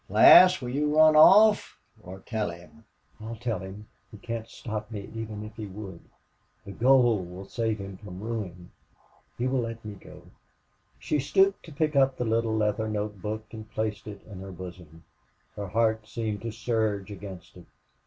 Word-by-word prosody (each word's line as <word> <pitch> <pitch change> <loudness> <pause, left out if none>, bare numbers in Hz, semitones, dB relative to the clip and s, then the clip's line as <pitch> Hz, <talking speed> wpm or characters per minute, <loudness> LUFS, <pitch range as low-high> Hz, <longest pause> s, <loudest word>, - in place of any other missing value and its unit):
Lass, 185 -2 +8
will 125 - -4
you 150 +3 0
run 155 0 +7
off 210 +7 +6 0.2
or 95 +2 -10
tell 110 -1 -3
him?" 85 +6 -13 0.4
"I'll 115 +1 -6
tell 115 -3 -3
him. 95 +3 -9 0.3
He 105 - -11
can't 115 +1 -5
stop 110 -2 -6
me, 105 -3 -6
even 110 -2 -6
if 110 0 -11
he 110 -2 -5
would.... 95 -3 -9 0.7
The 100 - -8
gold 120 -4 +3
will 90 +2 -9
save 110 0 -2
him 100 -1 -8
from 95 -2 -10
ruin....He 105 +2 -8
will 130 0 +1
let 115 -1 -6
me 105 - -6
go." 100 - -14 0.7
She 150 - -1
stooped 195 +8 +2
to 165 - -11
pick 155 +1 -1
up 135 -1 +3
the 125 - -2
little 115 0 0
leather 105 +1 0
note 105 -2 -4
book 110 +2 -4
and 110 -1 -9
placed 110 -1 -3
it 100 -2 -9
in 100 -3 -10
her 95 0 -8
bosom. 90 -3 -11 0.5
Her 100 -1 -5
heart 110 +2 0
seemed 110 -3 -4
to 115 - -4
surge 110 -3 -2
against 95 -2 -10
it. - - -14
110 Hz, 175 wpm, -27 LUFS, 100-115 Hz, 0.7 s, Lass